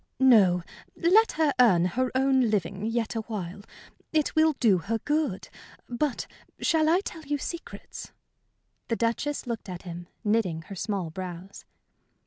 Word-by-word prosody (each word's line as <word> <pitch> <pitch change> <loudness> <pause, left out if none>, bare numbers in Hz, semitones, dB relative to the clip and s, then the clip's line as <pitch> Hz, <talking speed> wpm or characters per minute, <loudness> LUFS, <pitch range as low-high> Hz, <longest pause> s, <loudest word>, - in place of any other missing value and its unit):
"No, 200 -9 +5 0.3
let 415 +7 +4
her 305 -2 +2
earn 185 -9 +5
her 255 +8 0
own 265 -2 +3
living 200 0 -1
yet 230 -1 -1
awhile. 205 -4 -5 0.5
It 310 -2 +1
will 315 0 +4
do 220 -9 +3
her 225 +7 -2
good. 295 -5 -1 0.4
But 245 +1 -2 0.3
shall 315 -2 +2
I 350 +4 +4
tell 335 -4 -7
you 290 -1 -2
secrets?" 340 +4 -7 0.8
The 230 - 0
Duchess 235 +7 -1
looked 230 -4 -5
at 180 -1 -7
him, 175 -1 -8 0.2
knitting 205 -7 0
her 195 - -9
small 190 -4 -3
brows. 185 +2 -8
230 Hz, 140 wpm, -27 LUFS, 190-290 Hz, 0.8 s, No